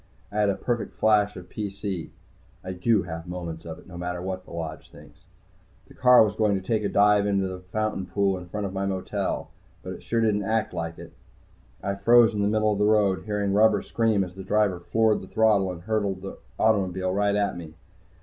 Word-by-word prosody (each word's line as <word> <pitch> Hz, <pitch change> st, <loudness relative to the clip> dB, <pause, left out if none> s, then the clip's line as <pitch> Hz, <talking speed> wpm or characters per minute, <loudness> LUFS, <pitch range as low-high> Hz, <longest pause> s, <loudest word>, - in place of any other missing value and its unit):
I 105 Hz, -, -2 dB
had 105 Hz, -1 st, +3 dB
a 100 Hz, -, +1 dB
perfect 120 Hz, -2 st, -3 dB
flash 105 Hz, -1 st, +3 dB
of 90 Hz, -1 st, -9 dB
PC 100 Hz, -3 st, -5 dB, 0.5 s
I 95 Hz, -, -5 dB
do 100 Hz, +3 st, +1 dB
have 80 Hz, 0 st, -7 dB
moments 85 Hz, -2 st, -6 dB
of 80 Hz, -1 st, -7 dB
it, 90 Hz, -, -16 dB
no 85 Hz, -1 st, -10 dB
matter 90 Hz, 0 st, -3 dB
what 95 Hz, 0 st, -5 dB
the -, -, -15 dB
Lodge 85 Hz, -2 st, -6 dB
thinks. -, -, -17 dB, 0.6 s
The -, -, -16 dB
car 125 Hz, -2 st, +6 dB
was 105 Hz, -1 st, -1 dB
going 105 Hz, -3 st, +2 dB
to 95 Hz, -, -15 dB
take 110 Hz, -2 st, +1 dB
a 100 Hz, -, 0 dB
dive 105 Hz, 0 st, +4 dB
into 100 Hz, -1 st, +1 dB
the 95 Hz, -1 st, -6 dB
fountain 95 Hz, +1 st, -3 dB
pool 100 Hz, -1 st, +1 dB
in 90 Hz, -1 st, -8 dB
front 105 Hz, +3 st, -4 dB
of 95 Hz, -, -5 dB
my 100 Hz, 0 st, -2 dB
motel. 95 Hz, -1 st, -3 dB, 0.3 s
But -, -, -5 dB
it -, -, -10 dB
sure 115 Hz, -, -1 dB
didn't 105 Hz, -2 st, +2 dB
act 110 Hz, +1 st, -1 dB
like 85 Hz, 0 st, -4 dB
it. -, -, -11 dB, 0.7 s
I 100 Hz, -, -1 dB
froze 115 Hz, +3 st, +5 dB
in 105 Hz, -, -1 dB
the 100 Hz, -, +2 dB
middle 110 Hz, 0 st, +2 dB
of 100 Hz, -, -3 dB
the 105 Hz, -, +3 dB
road, 105 Hz, -3 st, +2 dB
hearing 105 Hz, -2 st, -1 dB
rubber 110 Hz, +1 st, +4 dB
scream 110 Hz, -4 st, +1 dB
as 90 Hz, -1 st, -7 dB
the 95 Hz, +1 st, -9 dB
driver 100 Hz, -2 st, +1 dB
floored 110 Hz, +4 st, +1 dB
the -, -, -10 dB
throttle 105 Hz, -4 st, +2 dB
and 85 Hz, -1 st, -9 dB
hurled 100 Hz, -3 st, -1 dB
the 95 Hz, -, -7 dB, 0.2 s
automobile 95 Hz, -4 st, +1 dB
right 100 Hz, +1 st, +1 dB
at 105 Hz, -1 st, 0 dB
me. 80 Hz, -2 st, -9 dB
100 Hz, 220 wpm, -25 LUFS, 90-105 Hz, 0.7 s, car